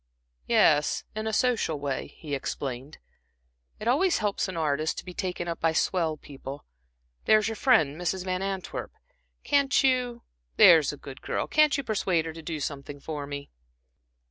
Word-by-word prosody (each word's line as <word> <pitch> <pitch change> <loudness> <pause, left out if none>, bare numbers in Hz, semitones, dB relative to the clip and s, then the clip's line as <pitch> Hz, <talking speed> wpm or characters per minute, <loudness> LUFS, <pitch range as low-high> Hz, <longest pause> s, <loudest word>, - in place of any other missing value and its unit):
"Yes, 150 0 +3
in 215 0 -4
a - - 0
social 220 - +1
way," 140 -1 -3
he 150 -3 -7
explained. 135 0 -4 0.8
"It 215 - -5
always 335 +9 +3
helps 205 -2 -1
an 185 -2 -5
artist 155 0 0
to - - -6
be 180 - -8
taken 180 -1 -3
up 170 -1 -3
by 165 0 +2
swell 160 -1 +1
people. 140 0 -9 0.6
There's 215 -1 +4
your 225 - -3
friend 160 - +3
Mrs. 180 +1 -2
Van 185 0 -1
Antwerp 195 -2 -4 0.5
can't 280 -1 +3
you 250 -3 +1 0.3
there's 160 -5 +7
a 145 - -9
good 135 -2 -10
girl - - -2
persuade 225 - +2
her 160 - -5
to 165 - -9
do 160 -1 -4
something 145 0 -5
for 145 -1 -5
me?" 140 0 -7
170 Hz, 160 wpm, -27 LUFS, 145-215 Hz, 0.8 s, there's